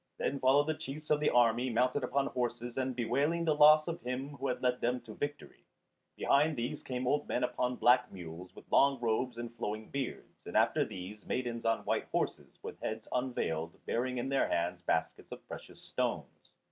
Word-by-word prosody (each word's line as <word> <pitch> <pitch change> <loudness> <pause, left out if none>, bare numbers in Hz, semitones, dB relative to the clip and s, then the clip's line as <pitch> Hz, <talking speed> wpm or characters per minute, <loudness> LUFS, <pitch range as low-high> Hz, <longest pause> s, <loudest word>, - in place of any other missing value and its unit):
Then 140 - -1
followed 135 +3 +4
the 155 - 0
chiefs 155 0 -7
of 150 - +4
the 150 - +3
army 120 +1 +3
mounted 125 +4 +1
upon 135 +2 +1
horses 120 -1 -3
and 130 -1 -1
bewailing 140 +8 +1
the 155 - +3
loss 155 +1 +7
of 170 0 -4
him 125 +3 -3
who 140 -1 -4
had 125 - -1
led 125 0 +1
them 125 +1 +1
to 115 -2 -10
victory; 145 +3 -6 0.5
behind 150 +3 +3
these 125 +6 -3
came 125 0 -4
old 145 +3 +1
men - - 0
upon 125 0 0
black 125 0 +4
mules, 90 0 -9
with - - -12
long 140 -1 +5
robes 120 +1 0
and 120 0 -6
flowing 110 +1 -4
beards; 140 -2 -5
and - - -1
after - - +4
these 95 +3 -8
maidens 120 -2 -2
on 115 0 +1
white - - 0
horses, - - -3
with - - -7
heads 110 0 -4
unveiled, 85 -11 -2
bearing 125 +2 -1
in 120 +2 -2
their 135 0 +2
hands 90 +1 -1
baskets - - -1
of - - -9
precious - - -9
stones. - - -3
125 Hz, 195 wpm, -32 LUFS, 115-140 Hz, 0.5 s, loss